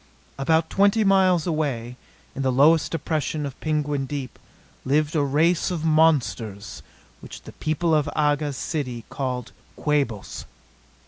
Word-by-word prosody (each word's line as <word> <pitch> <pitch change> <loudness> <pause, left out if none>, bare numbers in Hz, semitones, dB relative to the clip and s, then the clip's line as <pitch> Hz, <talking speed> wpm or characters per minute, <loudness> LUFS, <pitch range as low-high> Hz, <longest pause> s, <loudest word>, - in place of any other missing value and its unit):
About 160 +3 +2
twenty 200 +3 +3
miles 190 -4 +3
away, 140 -8 -2 0.4
in 135 - -5
the 130 -1 +1
lowest 150 +5 +4
depression 155 -2 -2
of 135 -2 -7
Penguin 150 -3 -1
Deep, 140 -4 -6 0.4
lived 150 +3 +1
a 150 - +3
race 155 +6 +2
of 170 -3 -3
monsters 145 -10 +1 0.4
which - - -11
the - - -10
people 160 +2 -1
of 150 -2 +2
Aga's 145 -2 0
city 125 -8 -4
called 125 -3 -4 0.2
Quabos. 140 -9 -2
150 Hz, 130 wpm, -24 LUFS, 135-160 Hz, 0.4 s, lowest